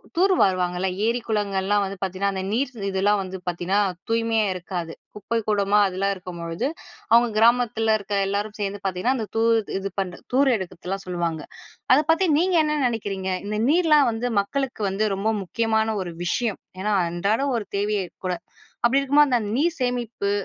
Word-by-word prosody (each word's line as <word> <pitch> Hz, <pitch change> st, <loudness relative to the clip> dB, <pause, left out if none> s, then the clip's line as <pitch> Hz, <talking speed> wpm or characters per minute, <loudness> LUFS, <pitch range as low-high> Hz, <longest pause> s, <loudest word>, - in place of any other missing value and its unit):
தூர் 375 Hz, +3 st, +4 dB
வாருவாங்கல்ல 185 Hz, 0 st, +1 dB, 0.2 s
ஏரி 235 Hz, +2 st, +1 dB
குளங்கள்லாம் 205 Hz, -2 st, +1 dB
வந்து 195 Hz, +1 st, -6 dB
பார்த்தீங்கன்னா 195 Hz, +1 st, -1 dB
அந்த 190 Hz, -, -3 dB
நீர் 260 Hz, +5 st, 0 dB, 0.2 s
இதெல்லாம் 200 Hz, +2 st, +2 dB
வந்து 190 Hz, 0 st, -6 dB
பார்த்தீங்கன்னா, 175 Hz, +3 st, 0 dB, 0.3 s
தூய்மையா 225 Hz, -1 st, +2 dB
இருக்காது. 175 Hz, -2 st, -5 dB, 0.2 s
குப்பை 230 Hz, +2 st, -2 dB
கூளமா 205 Hz, -1 st, +3 dB
அதுல்லாம் 195 Hz, +2 st, -1 dB
இருக்கும்பொழுது, 175 Hz, +4 st, -4 dB, 0.4 s
அவங்க 235 Hz, +1 st, +6 dB
கிராமத்துல 225 Hz, -1 st, +3 dB
இருக்க 205 Hz, +1 st, -6 dB
எல்லோரும் 205 Hz, +2 st, -2 dB
சேர்ந்து 200 Hz, 0 st, -2 dB
பார்த்தீங்கன்னா, 190 Hz, +8 st, 0 dB
அந்த 220 Hz, -, -3 dB
தூர் 230 Hz, 0 st, +4 dB, 0.2 s
இது 195 Hz, 0 st, -4 dB
பண்ற 180 Hz, -2 st, -3 dB
தூர் 270 Hz, 0 st, +4 dB
எடுக்குறதெல்லாம் 190 Hz, 0 st, -5 dB
சொல்லுவாங்க. 170 Hz, -3 st, -2 dB, 0.5 s
அத 265 Hz, -, +6 dB
பத்தி 355 Hz, +3 st, +2 dB
நீங்க 365 Hz, +1 st, +2 dB
என்ன 300 Hz, 0 st, 0 dB
நினைக்கிறீங்க? 195 Hz, -5 st, -3 dB
இந்த 210 Hz, +1 st, -2 dB
நீர்லாம் 305 Hz, -4 st, +4 dB
வந்து 230 Hz, +2 st, -2 dB
மக்களுக்கு 260 Hz, +1 st, -3 dB
வந்து 205 Hz, +3 st, 0 dB
ரொம்ப 210 Hz, +3 st, 0 dB
முக்கியமான 220 Hz, +2 st, 0 dB
ஒரு 175 Hz, -2 st, -5 dB
விஷயம். 220 Hz, +4 st, -1 dB, 0.2 s
ஏன்னா 210 Hz, +1 st, 0 dB, 0.2 s
அன்றாடம் 215 Hz, +10 st, 0 dB
ஒரு 210 Hz, -4 st, -5 dB
தேவையே 205 Hz, -1 st, 0 dB, 0.2 s
கூட. 180 Hz, -, 0 dB, 0.5 s
அப்படி 265 Hz, +3 st, +4 dB
இருக்கும்போது 285 Hz, 0 st, +4 dB
அந்த 240 Hz, -2 st, +3 dB, 0.2 s
நீர் 330 Hz, +3 st, +1 dB
சேமிப்பு 240 Hz, -5 st, -1 dB
210 Hz, 160 wpm, -24 LUFS, 190-240 Hz, 0.5 s, அவங்க